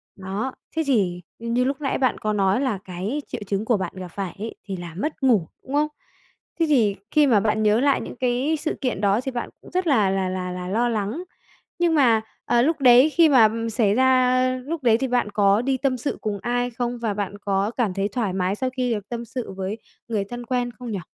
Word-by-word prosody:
Đó, 195 +7 -4 0.2
thế 320 - +1
thì, 185 -9 +1 0.2
ưm, 230 0 -3
như 250 - +3
lúc 275 +3 -2
nãy 270 - 0
bạn 255 -2 +1
có 215 0 -1
nói, 195 +4 +2
là 250 -7 0
cái 190 +11 -3
triệu - - -6
chứng 200 +2 -1
của 230 -3 +2
bạn 190 - -4
gặp 185 -1 -6
phải 190 0 -5
ấy 225 +2 -5
thì 195 -2 -4
là 170 -2 -8
mất 295 +5 -3
ngủ, 220 -11 +3 0.2
đúng 265 - -8
không? 300 +1 +3 0.7
Thế 330 - +4
thì 220 -9 +3 0.2
khi 300 -2 +4
mà 220 -5 +5
bạn 215 +1 +1
nhớ 215 +2 +4
lại 280 0 +2
những - - -7
cái 255 +5 0
sự 315 - -2
kiện 245 -7 -1
đó, 200 +3 +2
thì 265 - -4
bạn 240 - -4
cũng - - -15
rất 365 -1 0
là 215 -9 +4
là 190 -1 0
là 185 -1 -3
là 180 0 -5
lo 235 +5 +1
lắng, 220 - -2 0.6
nhưng 340 -2 +3
mà, 235 -6 +4 0.2
ờ, 240 0 +3
lúc 310 +3 +1
đấy 255 +3 +7
khi 325 0 +5
mà, 255 -5 +7
ừm, 230 +1 -1
xảy 215 -2 +2
ra, 260 - +3
a 255 0 +3
lúc 315 -1 -4
đấy, 230 -2 +5
thì 265 - -1
bạn 245 -4 +1
có 200 +1 +3
đi 265 +1 0
tâm 260 -1 0
sự 280 - -3
cùng 210 -2 -2
ai 245 0 0
không? 240 +1 -3
Và 225 -3 -1
bạn 205 0 -4
có 200 +1 0
cảm 220 -7 +1
thấy 195 +1 0
thoải 210 -3 -2
mái 190 +1 0
sau 260 +3 -1
khi 250 -2 +1
được 205 -2 -5
tâm 235 -1 -4
sự 235 0 -5
với 190 +3 -4 0.3
người 215 -4 -1
thân 240 +3 -7
quen 245 0 -1
không 245 -2 -6
nhỉ? 195 - -2
235 Hz, 245 wpm, -23 LUFS, 200-255 Hz, 0.7 s, đấy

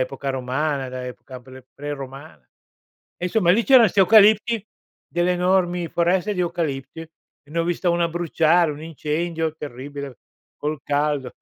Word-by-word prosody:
epoca 135 +2 -3
romana, 135 +2 -2
da 125 0 -6
epoca 125 +1 -10
pre 130 0 -14
pre-romana. 135 - -8 0.7
E - - -4
insomma 180 -2 +2
lì 225 +4 +2
c'erano 255 -5 +7
'sti 200 - -5
eucalipti, 215 +2 +5 0.4
delle 175 +1 +1
enormi 180 -1 +1
foreste 180 +4 +1
di 180 - -2
eucalipti, 160 -5 -3
e 165 0 -10 0.4
ne 165 - -3
ho 165 - +1
vista 175 +1 0
una 170 0 +1
bruciare, 170 0 +2
un 145 +1 -10
incendio 160 +1 -3
terribile, 140 -1 -8 0.4
col 150 0 -3
caldo. 145 -3 -1
160 Hz, 145 wpm, -22 LUFS, 135-175 Hz, 0.7 s, c'erano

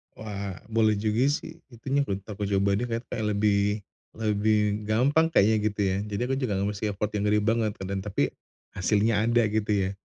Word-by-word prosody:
Wah 100 -3 -5 0.2
boleh 110 -1 +3
juga 110 +5 +1
sih, 160 +3 -3
itu 120 -4 -17
nyimpulin 135 -9 0
aku 105 0 -5
coba 100 0 +1
deh 125 - -2
kayak 115 0 -3
kayak 110 - -2
lebih 100 0 +1 0.3
lebih 105 -1 +1
gampang 140 +9 +3
kayaknya 110 -8 +4
gitu 105 0 -5
ya, 95 -1 +1
jadi 105 +1 -3
aku 135 - +1
juga 130 -5 -1
nggak 100 +1 0
mesti 100 - -8
repotin 105 +1 -2
diri 105 0 +3
banget 110 0 +1
kan 95 - -6
dan 100 - -1
tapi 100 0 -1 0.4
hasilnya 105 +3 +2
ada 120 0 +3
gitu 110 0 0
ya. 95 -2 +1
105 Hz, 190 wpm, -26 LUFS, 100-115 Hz, 0.4 s, kayaknya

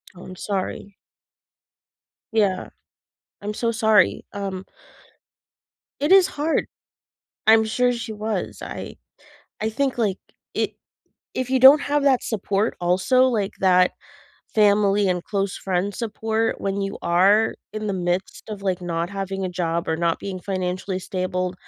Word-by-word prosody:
Oh, 180 - -12
I'm 185 - -9
sorry. 195 +1 -4 1.3
Yeah. 200 -4 +1 0.7
I'm 210 +1 -4
so 230 +1 -1
sorry. 220 -1 +3
Um 195 -2 -4 1.4
It 295 +4 +1
is 385 -1 +7
hard. 300 +3 -1 0.8
I'm 220 0 +6
sure 245 +3 +1
she 230 -2 -5
was. 210 -2 -3
I - - -7 0.6
I 220 - 0
think, 265 +3 -1
like, 205 -5 0 0.4
i - - 0 0.6
if 255 -1 -2
you 260 -1 +2
don't 270 +4 +9
have 290 0 0
that 270 -3 +3
support 205 -1 -1
also, 185 +9 +3
like 215 -6 0
that 185 -1 +4 0.6
family 205 -1 +4
and 180 -1 0
close 195 -2 -2
friend 190 +1 -2
support 225 0 -2
when 195 0 -2
you 195 0 -3
are 195 +6 +4 0.2
in 215 0 -4
the 205 - -1
midst 180 0 -2
of, 205 -2 -6
like, 185 -2 -1
not 170 0 -2
having 195 -1 -4
a - - -1
job 170 -1 -2
or 160 - +1
not 170 0 0
being 190 -2 -6
financially 185 0 -3
stable, 185 0 -2
200 Hz, 140 wpm, -23 LUFS, 185-220 Hz, 1.4 s, don't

